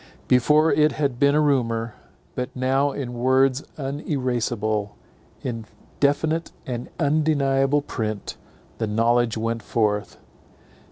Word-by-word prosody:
Before 150 +6 +4
it 150 -1 +3
had 140 -5 -1
been 140 0 +4
a - - +4
rumour; 115 -6 +1 0.4
but 125 0 -3
now 135 +2 +1
in 130 -3 -5
words 130 +2 +2
uneraseable, 125 -7 -2 0.5
in 115 -3 -4 0.3
definite 155 +3 +1
and 120 -1 -5
undeniable 145 -2 +2
print, 110 -7 -4 0.4
the 110 - 0
knowledge 115 +2 +2
went 115 +1 -2
forth. 105 -2 -1
130 Hz, 110 wpm, -23 LUFS, 115-145 Hz, 0.5 s, Before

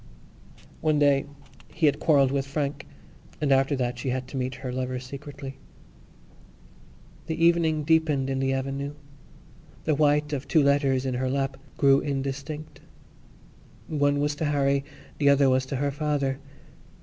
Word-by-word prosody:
One 155 -1 +2
day 145 -2 +3 0.4
he 160 - 0
had 145 - +3
quarrelled 140 -4 +4
with 140 0 -1
Frank 140 0 -3 0.5
and 145 -2 0
after 135 +2 +3
that 125 -2 -2
she 130 - -2
had 130 0 -2
to - - -9
meet 130 0 -2
her 125 - -2
lover 130 0 -2
secretly. 135 +1 -8 1.7
The 160 - -2
evening 165 -3 +3
deepened 155 -3 +2
in 135 0 -1
the 135 0 +1
avenue. 135 +2 -3 0.9
The 155 - +1
white 150 0 +2
of 140 -1 -3
two 155 -3 +4
letters 140 -2 +2
in 130 - -1
her 130 +1 -1
lap 135 0 -1 0.2
grew 140 -1 +5
indistinct. 140 +2 -4 1.1
One 145 -2 +1
was 145 +1 +1
to 160 - -1
Harry; 140 -1 +1 0.4
the 145 -1 +4
other 140 -1 +5
was 130 0 +1
to 135 - -3
her 140 +2 0
father. 140 -2 -1
140 Hz, 150 wpm, -26 LUFS, 135-150 Hz, 1.7 s, grew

